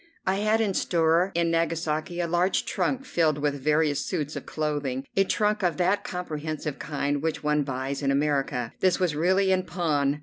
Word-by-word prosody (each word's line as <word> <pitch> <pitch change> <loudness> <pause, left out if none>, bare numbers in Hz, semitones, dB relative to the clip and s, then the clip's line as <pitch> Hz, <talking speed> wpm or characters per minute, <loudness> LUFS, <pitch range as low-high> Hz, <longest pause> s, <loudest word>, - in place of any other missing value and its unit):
I 190 +1 +1
had 215 +2 +2
in 205 -3 +1
store 170 +1 +2
in 170 -1 +2
Nagasaki 165 0 -1
a 170 - -1
large 175 +3 +1
trunk 270 0 -1
filled 155 -3 +1
with 145 -1 -1
various 150 0 +2
suits 150 0 -3
of - - -7
clothing, 145 -4 -2
a 195 - +5
trunk 210 +2 +1
of 175 -3 +1
that 185 +3 +1
comprehensive 155 -4 -4
kind 145 -1 -2
which 160 0 -2
one 150 0 +2
buys 135 0 -3
in 140 - 0
America. 140 -4 0
This 185 0 +2
was 175 -5 +1
really 190 +5 +2
in 185 0 +3
pawn. 150 -6 0
160 Hz, 180 wpm, -26 LUFS, 145-180 Hz, -, a